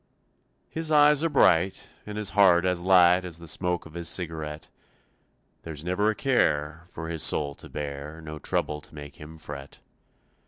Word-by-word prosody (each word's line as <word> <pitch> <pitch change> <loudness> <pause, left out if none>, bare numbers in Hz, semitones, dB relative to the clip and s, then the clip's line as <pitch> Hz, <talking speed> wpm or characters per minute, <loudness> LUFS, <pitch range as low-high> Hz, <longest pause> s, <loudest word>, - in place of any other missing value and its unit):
His 160 -1 -3
eyes 150 0 +5
are 165 - +2
bright 95 - +3 0.2
And 105 0 -6
his 105 -2 -1
heart 90 -3 +5
as 90 -1 +1
light 90 0 +5
As 90 -3 -3
the 85 0 -10
smoke 90 +2 -1
of 80 - -13
his 85 -1 -3
cigarette; 80 -3 -4 0.9
There's 80 -2 -8
never 90 +5 +1
a 110 - 0
care 80 - 0
For 80 -2 -7
his 80 -1 -3
soul 70 0 +2
to - - -13
bear, 75 +1 -6
No 75 -1 -8
trouble 75 +1 -2
to 75 - -14
make 75 -1 -10
him 80 +2 -11
fret. 70 -3 -9
85 Hz, 170 wpm, -26 LUFS, 75-95 Hz, 0.9 s, eyes